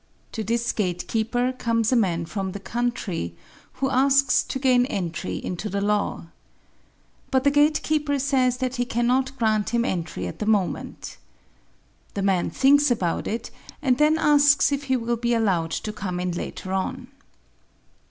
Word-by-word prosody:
To 220 - -4
this 235 +2 0
gatekeeper 225 +6 -1
comes 230 -2 0
a - - +3
man 175 -7 +1
from 190 +1 -4
the 200 - -6
country 215 - -3 0.4
who 265 +1 -2
asks 270 0 +4
to - - -5
gain 255 -2 +3
entry 185 - -3
into 185 +4 -4
the 200 - -2
law. 205 -3 -1 1.0
But 260 -2 +2
the 285 - +4
gatekeeper 295 0 +2
says 260 -2 +1
that 255 0 -2
he 245 - 0
cannot 250 +3 0
grant 215 -3 +1
him 235 +1 +1
entry 175 -7 -3
at - - -7
the 210 - -3
moment. 205 -5 -1 1.0
The 200 - -1
man 190 -3 +1
thinks 285 +2 +4
about 185 -9 -1
it 225 +2 -4 0.3
and 260 -3 +1
then 305 +1 +4
asks 290 -2 +4
if 280 0 -2
he 260 -1 +1
will 235 0 -1
be 235 +1 0
allowed 190 -8 +1
to 210 +6 -4
come 185 -4 -4
in 180 0 -1
later 185 +2 -5
on. 245 +7 -3
235 Hz, 160 wpm, -24 LUFS, 200-265 Hz, 1.0 s, asks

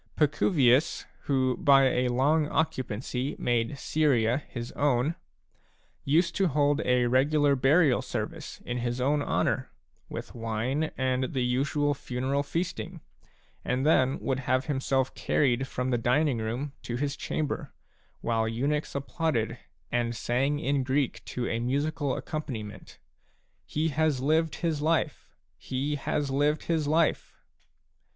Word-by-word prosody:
Paciryius, 145 -2 +3 0.2
who 130 -2 +1
by 135 -2 +4
long 145 +5 +2
occupancy 130 -4 -2
made 120 +1 0
Syria^y 140 -4 +1
his 120 -1 -6
own/ 145 +1 +1 0.9
used 160 +6 +2
to 195 -2 +3
hold 145 0 +2
a 125 -1 +3
regular 140 +3 +3
burial 140 +1 +4
sacrifice - - -5
in 125 0 -3
his 120 +1 -2
own 145 +3 +2
honour, - - 0 0.4
with - - -7
wine 115 +6 -1
and 130 0 0
the 130 - +1
usual 140 +4 +1
funeral 130 +1 -2
feasting, 170 +2 -4 0.6
and 130 +2 -1
then 135 -4 +3
would 135 -1 -1
have 130 +1 0
himself 135 -2 0
carried 135 -1 +1
from 125 0 -2
the 120 - +1
dining 125 +2 +2
room 120 +6 -3
to 120 - -4
his 140 +2 -1
chamber, 150 +1 -3 0.5
while 115 -1 0
eunuchs 140 +8 -1
applauded 130 -5 -1 0.3
and 120 -1 0
sang 135 +6 0
in 140 -1 0
Greek 130 +1 -1
to 125 -1 -3
a 115 - -1
musical 140 +3 -1
accom 155 0 -5
paniment: 105 -6 -7 0.3
" - - -41 0.3
He 155 +2 0
has 155 -2 +1
lived 155 +2 +1
his 160 -4 -1
life, 160 +2 0 0.3
he 135 +3 -2
has 145 0 -1
lived 145 +3 +1
his 160 -3 0
life 160 +1 +1
135 Hz, 135 wpm, -28 LUFS, 125-150 Hz, 0.9 s, by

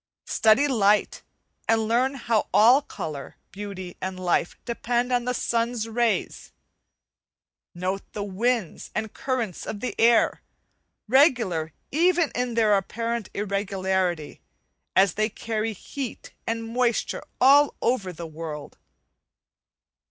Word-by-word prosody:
Study 225 +6 +4
light, 210 -5 +2 0.5
and 225 -1 +2
learn 255 +4 +2
how 230 -4 0
all 245 +6 +6
colour, 150 - -7 0.2
beauty, 195 -3 -7
and 185 0 -4
life 175 -1 0
depend 240 +1 -1
on 245 -1 +1
the 250 - 0
sun's 230 -1 -1
rays; 230 0 -1 1.2
note 185 +3 -2
the 205 - -3
winds 210 0 -1
and 220 0 -3
currents 255 -9 -3
of 205 - -4
the 250 - -3
air, 235 0 +4 0.7
regular 225 - +3 0.2
even 340 +1 +3
in 245 -1 -2
their 215 -3 +4
apparent 230 +3 -2
irregularity, 190 -5 -1 0.5
as 190 -1 +5
they 215 +1 0
carry 225 0 -3
heat 260 +5 -7 0.2
and 230 0 -1
moisture 240 0 0 0.2
all 280 +3 +6
over 210 -7 0
the 170 0 -8
world. 155 -2 -7
220 Hz, 115 wpm, -25 LUFS, 190-245 Hz, 1.2 s, all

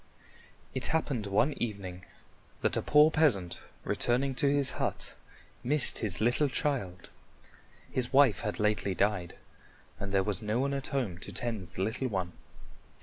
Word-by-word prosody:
It 130 -2 -1
happened 140 -9 -1
one 105 +9 +2
evening 100 -5 -4 0.6
that - - +1
a - - 0
poor 150 +1 +5
peasant 110 - +1 0.2
returning 130 +3 0
to 135 +2 +1
his 140 -2 +2
hut - - -3 0.5
missed 145 +2 +2
his 105 -5 +2
little 120 +6 +2
child. 100 -11 -3 0.8
His 125 -1 -1
wife 135 -8 +5
had 105 - -3
lately 105 -2 +1
died, 100 -3 0 0.6
and 100 0 -4
there 95 -1 +3
was 100 -3 0
no 105 +1 -1
one 140 +1 0
at 135 -1 -3
home 115 -11 -2
to - - -7
tend 110 -6 -3
the 90 +2 -4
little 115 +6 -1
one. 95 -6 -2
115 Hz, 150 wpm, -30 LUFS, 100-135 Hz, 0.8 s, poor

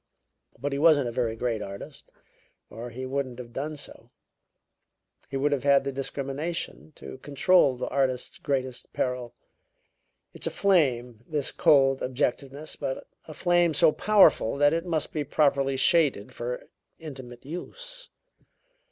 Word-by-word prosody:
But 145 +1 -3
he 140 - -2
wasn't 150 -4 +5
a - - -3
very 115 -2 -1
great 115 -2 -2
artist, 100 -1 -9 0.6
or 115 +3 -7
he 130 +3 -6
wouldn't 130 -2 -3
have 120 -2 -9
done 150 +4 -4
so; 145 - -12 1.2
he 135 - -3
would 145 +2 +1
have 140 -3 0
had 140 -1 +5
the 140 - -2
discrimination 140 +5 -4
to 130 - -10
control 145 +1 +3
the 125 - -4
artist's 130 -2 -1
greatest 130 -3 -3
peril. 125 -2 -2 1.0
It's - - -5
a - - +2
flame, 125 - +1
this 150 -3 -1
cold 135 -2 +4
objectiveness, 135 +3 -2
but 130 - -4 0.2
a 155 - -10
flame 175 -2 +2
so 160 +1 +5
powerful 200 - +4
that 145 +1 +4
it 165 +2 -2
must 160 -3 -1
be 150 - -1
properly 140 -2 +2
shaded 135 -7 +3
for 125 +1 -5 0.3
intimate 130 -7 -10
use. - - -5
140 Hz, 145 wpm, -27 LUFS, 125-155 Hz, 1.2 s, wasn't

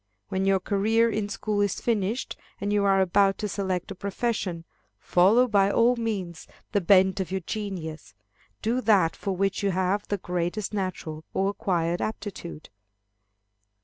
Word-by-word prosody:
When 190 0 -1
your 195 -1 +4
career 220 +4 +2
in 210 -1 -2
school 205 +1 -1
is 205 -1 0
finished, 225 +1 -1 0.2
and 205 +1 -1
you 205 -1 +2
are 195 -1 +4
about 195 +1 +3
to 210 - -2
select 190 -2 -3
a - - -3
profession, 195 -3 -3 0.3
follow 210 +8 +4
by 200 -3 +3
all 235 +4 +4
means 195 -8 -4 0.2
the 205 - +1
bent 190 +1 +4
of 190 - -2
your 190 0 -2
genius. 180 -6 -6 0.5
Do 235 +3 +1
that 200 -8 +3
for 195 -2 -3
which 195 +1 0
you 200 - +1
have 190 +2 0
the 205 - -1
greatest 180 +3 -3
natural 180 -6 -4
or 195 +1 +1
acquired 175 -5 -1
aptitude. 195 -7 -6
195 Hz, 155 wpm, -26 LUFS, 185-210 Hz, 0.5 s, your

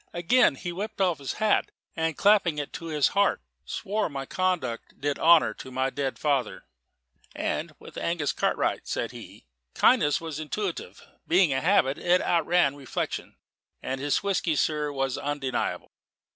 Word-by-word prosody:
Again 175 - +3
he 175 +6 -5
whipped 210 +5 -5
off 180 -5 +2
his 140 - -4
hat, 215 -1 +1 0.3
and 160 -2 -1
clapping 200 -6 +4
it 145 -1 -4
to 165 - -7
his 150 -3 +2
heart, 200 -1 +2 0.3
swore 205 - -2
my 135 -2 -5
conduct 175 -10 -2
did 145 0 -1
honour 165 -8 +5
to 130 - -10
my 130 +1 -1
dead 135 -2 -3
father; 140 -4 -1 0.7
"and - - -3
with - - -10
Angus 170 -4 -1
Cartwright," - - -1
said - - -2
he, - - -12 0.3
"kindness 145 0 +4
was 160 -2 -6
intuitive. 175 +4 -5 0.2
Being 175 -4 +4
a 130 - 0
habit, 155 -6 +2
it 180 +1 +3
outran 170 -4 +2
reflection; 135 -4 -4 0.5
and 130 +1 -3
his 145 +5 0
whisky, 185 -5 0
sir, 150 0 0
was 135 -2 -2
undeniable. 140 -3 -3
155 Hz, 155 wpm, -27 LUFS, 140-180 Hz, 0.7 s, honour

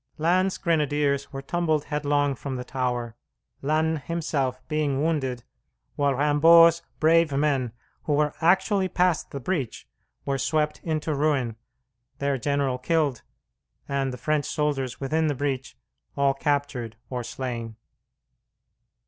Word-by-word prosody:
Lannes's 185 +4 +2
grenadiers 145 -4 0
were 135 0 -6
tumbled 160 -1 0
headlong 145 -1 0
from 135 0 -5
the 125 - -4
tower, 125 -3 -2 0.5
Lannes 155 +2 +1
himself 145 -6 -1
being 150 -3 0
wounded, 135 -7 -1 0.5
while 140 -1 +1
Rimbaud's 165 +4 +6 0.2
brave 165 0 +4
men, 135 -4 +1 0.3
who 150 - +1
were 150 0 +2
actually 190 +3 +3
past 180 -2 +1
the 140 - -5
breach, 140 -4 -3 0.4
were 135 -1 -1
swept 150 +3 0
into 155 -1 -1
ruin, 140 -6 +1 0.6
their 140 -1 -1
general 140 -1 0
killed, 145 -4 0 0.7
and 135 -1 -1
the 125 - -6
French 150 0 0
soldiers 145 -4 -1
within 155 +4 0
the 145 - 0
breach 135 -1 -3 0.4
all 140 -1 +3
captured 140 -5 -1 0.2
or 125 -1 -3
slain. 120 -2 -5
145 Hz, 125 wpm, -25 LUFS, 135-155 Hz, 0.7 s, Rimbaud's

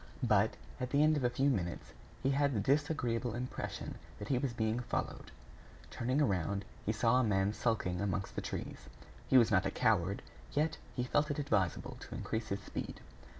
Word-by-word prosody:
But, - - +4 0.2
at 125 - -2
the 145 +2 +4
end 155 0 +5
of 145 - -1
a 125 - +4
few 130 +3 +1
minutes, 85 -7 -3 0.3
he 135 - +3
had 140 -1 +2
the - - +2
disagreeable 130 - +1
impression 125 +1 -4 0.2
that 105 +1 -7
he 130 - +3
was 135 -1 -1
being 110 0 0
followed. 125 - -3 0.6
Turning 130 +4 0
around, 100 - +1 0.2
he 110 - +1
saw 115 +3 +3
a - - +3
man 100 -2 +2
skulking 100 -6 0
amongst 95 -1 -1
the - - -1
trees. - - -6 0.4
He 130 - +6
was 115 -3 +6
not - - +4
a - - +1
coward; - - +1 0.3
yet 155 +2 +1 0.2
he 125 - 0
felt 145 +5 +2
it 145 - -1
advisable 110 -11 0
to - - -8
increase 110 0 -3
his 100 +1 -2
speed. - - -5
120 Hz, 190 wpm, -34 LUFS, 105-140 Hz, 0.6 s, He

